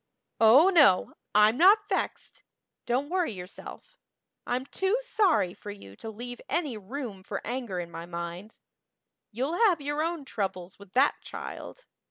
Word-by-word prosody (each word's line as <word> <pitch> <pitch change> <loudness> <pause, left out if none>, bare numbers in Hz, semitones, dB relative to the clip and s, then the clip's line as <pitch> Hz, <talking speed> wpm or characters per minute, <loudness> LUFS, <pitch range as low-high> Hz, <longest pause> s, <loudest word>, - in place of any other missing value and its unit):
Oh, 250 +11 +7
no, 285 - +5 0.2
I'm 210 +3 +5
not 410 +5 +6
vexed - - -3 0.5
don't 270 +6 0
worry 360 -7 +1
yourself. 185 - -10 0.5
I'm 250 +2 -1
too 385 - 0
sorry 395 - +2
for 205 - -11
you 150 - -10
to 225 - -7
leave 245 +3 -8
any 305 -8 -1
room 215 -1 -6
for 195 +1 -5
anger 235 -6 -3
in 170 -1 -6
my 165 +1 -8
mind. 170 +4 -7 0.7
You'll 265 +10 -2
have 350 -6 +2
your 290 +1 -2
own 330 -2 -2
troubles 190 -6 -4
with 200 -2 -15
that 270 +3 +3
child. - - -8
245 Hz, 150 wpm, -28 LUFS, 195-320 Hz, 0.7 s, Oh